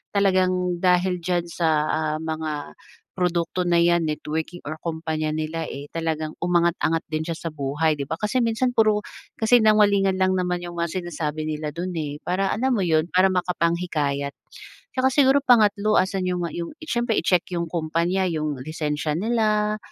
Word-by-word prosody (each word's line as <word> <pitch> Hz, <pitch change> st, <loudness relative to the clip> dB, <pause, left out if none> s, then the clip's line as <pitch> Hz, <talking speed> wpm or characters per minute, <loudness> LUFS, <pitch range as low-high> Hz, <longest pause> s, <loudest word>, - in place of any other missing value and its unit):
talagang 185 Hz, -2 st, +2 dB
dahil 180 Hz, 0 st, +3 dB
diyan 175 Hz, -1 st, 0 dB
sa, 165 Hz, -1 st, 0 dB, 0.2 s
ah, 155 Hz, 0 st, 0 dB
mga 155 Hz, -, -4 dB, 0.4 s
produkto 180 Hz, 0 st, 0 dB
na 175 Hz, -1 st, +3 dB
'yan, 170 Hz, -1 st, +3 dB
networking, 160 Hz, +3 st, -4 dB
or 155 Hz, +1 st, -5 dB
kumpanya 160 Hz, -2 st, -2 dB
nila, 155 Hz, +1 st, -3 dB
eh, 140 Hz, +1 st, -7 dB
talagang 160 Hz, -1 st, -2 dB
umangat-angat 170 Hz, -2 st, +1 dB
din 155 Hz, 0 st, -2 dB
siya 165 Hz, -1 st, -3 dB
sa 165 Hz, -, -5 dB
buhay, 150 Hz, +2 st, 0 dB
'di 140 Hz, -, -3 dB
ba? 160 Hz, -, -2 dB
Kasi 240 Hz, +4 st, 0 dB
minsan 230 Hz, +2 st, +1 dB
puro 215 Hz, -2 st, +3 dB, 0.4 s
kasinungalingan 210 Hz, -4 st, +4 dB
lang 185 Hz, 0 st, +3 dB
naman 180 Hz, -1 st, -1 dB
yung 175 Hz, 0 st, -8 dB
mga 170 Hz, +2 st, -1 dB
sinasabi 155 Hz, -3 st, -3 dB
nila 150 Hz, 0 st, -3 dB
dun, 180 Hz, +2 st, -3 dB
eh, 150 Hz, -2 st, -3 dB
para 190 Hz, +2 st, 0 dB
alam 255 Hz, +4 st, +1 dB
mo 205 Hz, -, 0 dB
yun, 160 Hz, -1 st, +2 dB
para 185 Hz, +1 st, +5 dB
makapanghikayat. 170 Hz, -6 st, -1 dB, 0.6 s
Tsaka 260 Hz, 0 st, +2 dB
siguro 280 Hz, 0 st, +5 dB
pangatlo, 215 Hz, -3 st, +4 dB
asan 190 Hz, 0 st, +1 dB
yung, 180 Hz, -1 st, -1 dB
ah, 165 Hz, -, -6 dB
yung 170 Hz, -, -5 dB
siyempre 240 Hz, -6 st, -1 dB
i-check 180 Hz, -2 st, +2 dB
yung 170 Hz, -, -1 dB
kumpanya, 170 Hz, +3 st, 0 dB
yung 155 Hz, -3 st, -2 dB
lisensya 150 Hz, -1 st, -2 dB
nila, 215 Hz, 0 st, +1 dB
175 Hz, 165 wpm, -23 LUFS, 155-195 Hz, 0.6 s, para